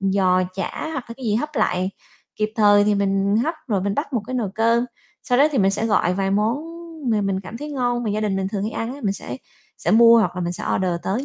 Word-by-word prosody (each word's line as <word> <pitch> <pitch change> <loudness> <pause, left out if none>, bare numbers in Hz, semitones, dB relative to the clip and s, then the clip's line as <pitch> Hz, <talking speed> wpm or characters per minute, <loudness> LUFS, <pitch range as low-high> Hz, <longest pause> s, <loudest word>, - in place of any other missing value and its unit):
giò 190 -1 +2
chả 195 +10 -4
hoặc 270 -5 -4
là - - -5
cái 265 - -9
gì 215 -2 +1
hấp 300 +7 -1
lại 185 +1 +1 0.5
kịp 215 0 -1
thời 205 -2 +5
thì 210 0 +2
mình 200 0 +1
hấp, 305 +9 0
rồi 200 -4 +1
mình 200 +1 -1
bắt 285 -1 -3
một 230 - 0
cái 255 - -5
nồi 225 -6 -1
cơm. 230 +2 +2 0.4
Sau 245 - +1
đó 285 - +6
thì 270 - +1
mình 195 -1 +4
sẽ 220 +3 -1
gọi 180 -4 +2
vài 195 0 -1
món 210 +5 +1 0.5
mà 215 -2 +2
mình 195 -1 -1
cảm 190 +4 -9
thấy 295 0 -6
ngon, 245 -2 0
mà 215 - -1
gia 210 +1 -1
đình 205 -3 0
mình 190 0 -1
thường 200 -1 -3
hay 215 - -2
ăn 230 +3 -3
á, 285 - -11
mình 195 - +1
sẽ 125 -10 -7 0.4
sẽ - - -1
mua 230 +1 +7
hoặc 180 -4 0
là 180 - -2
mình 175 0 -2
sẽ - - -6
order 185 -1 0
tới 225 +8 -2
210 Hz, 270 wpm, -22 LUFS, 195-235 Hz, 0.5 s, mua